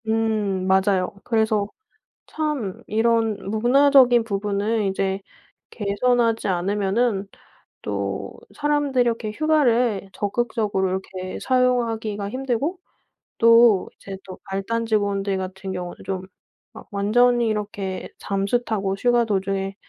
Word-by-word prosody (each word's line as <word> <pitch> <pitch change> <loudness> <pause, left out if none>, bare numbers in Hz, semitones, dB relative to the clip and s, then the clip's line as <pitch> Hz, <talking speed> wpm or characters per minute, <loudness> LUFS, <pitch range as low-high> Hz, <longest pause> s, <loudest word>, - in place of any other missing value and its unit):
음. 215 -4 0
맞아요. 190 -1 +2
그래서 220 -3 +1 0.6
참 295 -11 -3
이런 225 0 +1
문화적인 245 +1 +5
부분을 205 +1 -1
이제 195 0 -1 0.5
개선하지 230 +2 +1
않으면은 195 +3 0 0.6
또 - - -4 0.2
사람들이 290 -3 +1
이렇게 230 -2 -1
휴가를 245 -9 +2
적극적으로 205 -2 -1
이렇게 185 0 -5
사용하기가 230 -5 0
힘들고 270 - -2 0.6
또 230 -3 +6
이제 195 -1 -9
또 185 - -9
말단 230 +4 -2
직원들 200 -3 0
같은 190 +1 -5
경우는 180 -1 -5
좀 190 -1 -3 0.5
막 - - -12
완전히 235 +4 +3
이렇게 205 -3 -3
잠수 200 +5 -1
타고 195 -3 -1
휴가 240 +3 +2
도중에 195 -1 -1
215 Hz, 255 characters per minute, -23 LUFS, 195-240 Hz, 0.6 s, 또